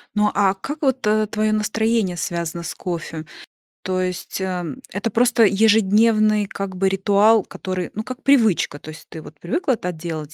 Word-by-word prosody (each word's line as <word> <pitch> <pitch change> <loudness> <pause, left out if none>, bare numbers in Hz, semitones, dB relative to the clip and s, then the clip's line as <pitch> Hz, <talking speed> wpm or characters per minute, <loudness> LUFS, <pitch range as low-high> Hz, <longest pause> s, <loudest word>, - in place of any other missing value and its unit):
Ну, 210 0 +2
а 195 -2 +3
как 290 +10 -7
вот, 265 -4 0
э, 215 0 +2
твое 215 +1 0
настроение 215 -3 0
связано 170 0 -3
с 170 - -5
кофе? 165 -3 -5 0.6
То 185 0 -1
есть, 185 +1 -4
а, 180 -2 -2 0.3
это 205 +4 -2
просто 240 0 +3
ежедневный 215 +1 +3
как 195 -1 -6
бы 190 +1 +1
ритуал, 205 +2 +3
который, 185 -2 -5
ну, 215 - -4
как 255 +3 -8
привычка, 225 - +3
то 155 - -11
есть 155 - -11
ты 160 - -9
вот 150 -1 -14
привыкла 260 - -1
так 180 -3 -4
делать 155 -2 -6
200 Hz, 175 wpm, -21 LUFS, 180-220 Hz, 0.6 s, а